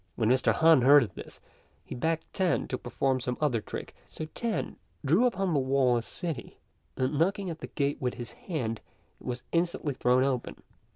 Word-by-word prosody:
When 110 -1 +1
Mr. 125 -2 +4
Han 160 +4 +5
heard 140 +2 +7
of 100 -6 -7
this, - - -10 0.5
he - - -7
begged 160 +5 -1
Tan 185 -3 +1
to 130 - -1
perform 130 +2 0
some 125 0 -3
other 130 -7 +1
trick; - - -7
so 155 - -6
Tan 235 -2 -2 0.3
drew 175 - +4
upon 195 -6 -1
the 145 - +3
wall 130 -2 +3
a 120 - +1
city, 160 0 -5 0.4
and 135 +3 0
knocking 190 +2 +1
at 160 - -7
the - - -6
gate 140 -1 -1
with 125 -2 -1
his 120 -1 -7
hand 120 - -4 0.4
it - - -12
was 125 -1 -3
instantly 170 -4 0
thrown 125 0 +3
open. 130 -3 -2
140 Hz, 190 wpm, -29 LUFS, 125-165 Hz, 0.5 s, heard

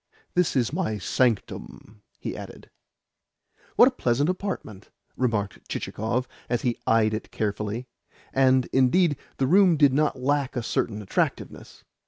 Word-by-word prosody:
"This 180 -3 +1
is 130 +1 +1
my 165 - -1
sanctum," 110 -1 -2 0.2
he - - -5
added. - - -10 1.0
"What - - +8
a - - +3
pleasant 140 +8 +1
apartment!" 185 - -6 0.3
remarked 105 -6 -2
Chichikov 120 +4 -2 0.2
as 120 -1 -1
he 120 -2 -1
eyed 110 -1 +3
it 110 - -4
carefully. 105 +3 -3 0.5
And, 130 -1 +4
indeed, 145 +5 +4 0.2
the 135 - +1
room 180 +2 +5
did 140 -3 +5
not 150 -2 +1
lack 140 +1 0
a 120 - -2
certain 105 -2 -2
attractiveness. 95 - -3
125 Hz, 135 wpm, -25 LUFS, 110-145 Hz, 1.0 s, What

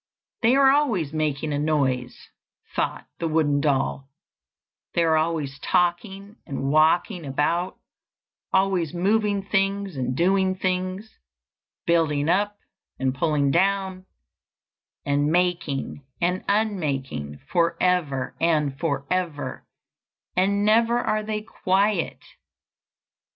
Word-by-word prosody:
"They 240 +2 +4
are 270 -1 +6
always 225 - +1
making 155 -1 -1
a 145 - -1
noise," 135 -5 -1 0.5
thought - - -2
the 165 - -1
wooden 150 -3 +2
doll; 135 -1 0 0.9
"they 170 - +3
are 160 -1 +3
always 155 -3 -1
talking 190 +5 -1
and 135 0 -2
walking 160 +4 +3
about, 165 +6 -1 0.7
always 190 -4 +1
moving 205 +2 +1
things 195 -2 0
and 130 -1 -2
doing 190 +2 +2
things, 185 +3 -3 0.7
building 160 -3 +2
up 205 +3 +1 0.4
and 130 0 0
pulling 145 0 +1
down, 190 +2 0 1.0
and 145 +1 +1
making 170 -6 -1 0.2
and 180 +2 0
unmaking 140 - -1
for 170 -2 +1
ever 155 -8 0
and 150 -4 +1
for 140 -4 -1
ever, 175 -5 -3 0.7
and 200 +2 +2
never 230 +2 +4
are 215 -3 0
they 215 0 -3
quiet. 195 -2 0
170 Hz, 110 wpm, -24 LUFS, 145-195 Hz, 1.0 s, are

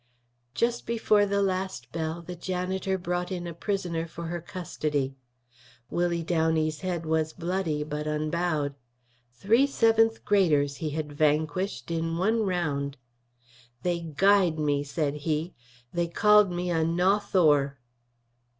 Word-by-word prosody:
Just 240 0 0
before 215 -3 +3
the 200 0 +1
last 185 -10 -2
bell 165 +1 -3
the 180 +1 -7
janitor 185 +2 -2
brought 180 0 -3
in 175 -2 -3
a 170 - -5
prisoner 170 -2 -2
for 170 +1 -8
her 175 0 -3
custody. 150 -6 -3 0.8
Willie 175 -1 0
Downey's 160 -2 +1
head 175 -3 -3
was 160 0 0
bloody 170 -4 -2
but 150 0 -4
unbowed; 155 -1 -1 0.6
three 220 - +3
seventh 225 -3 +3
graders 150 -9 +3
he 155 +3 -3
had 150 0 -4
vanquished 155 0 0
in 165 0 -1
one 220 +6 +2
round. 145 -8 -1 0.9
"They 175 -1 0
guyed 175 +1 +3
me," 145 -2 +1
said 145 0 -1
he. 155 +3 -2 0.4
"They 175 0 0
called 210 +2 +5
me 175 0 -2
a 165 -1 +2
Nawthour." 170 -5 +2
170 Hz, 130 wpm, -27 LUFS, 155-190 Hz, 0.9 s, called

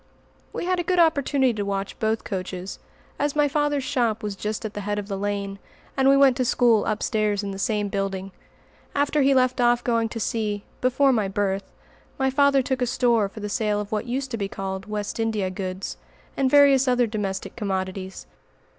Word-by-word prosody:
We - - -4
had 365 0 +1
a - - 0
good 365 +1 0
opportunity 280 -6 +3
to 210 - -3
watch 195 0 -3
both 220 0 0
coaches, 185 -1 -5 0.4
as 290 0 0
my 295 -1 +4
father's 290 -1 0
shop 240 -5 0
was 205 -1 -3
just 210 +2 -4
at 215 - -4
the 205 - -5
head 205 +1 -2
of 205 -1 -4
the 200 - -3
lane, 200 0 -3 0.4
and 270 0 +4
we 275 - +6
went 275 -2 +6
to 255 - +1
school 235 -3 +3
upstairs 215 -1 0
in 200 - -3
the 195 - -6
same 210 -1 0
building. 195 -1 -3 0.6
After 285 +1 +2
he 275 0 +4
left 255 -1 +2
off 240 0 +3
going 230 -2 +1
to 230 - -5
sea, 210 -3 -2 0.2
before 260 +2 +3
my 215 -4 +1
birth, 195 0 -2 0.5
my 265 0 +1
father 280 0 +4
took 260 0 -2
a 250 - +2
store 235 -4 +2
for 215 - -10
the 210 - -3
sale 210 -1 0
of 210 +1 -5
what 215 +2 -2
used 260 +2 -3
to 230 - -2
be 200 -2 -2
called 195 -1 -5
"West 210 +1 -4
India 215 -4 0
goods," 185 0 -5 0.4
and 270 -1 +2
various 280 -1 +6
other 250 -1 +3
domestic 205 -4 -4
commodities. 190 -3 -4
220 Hz, 200 wpm, -24 LUFS, 200-260 Hz, 0.6 s, we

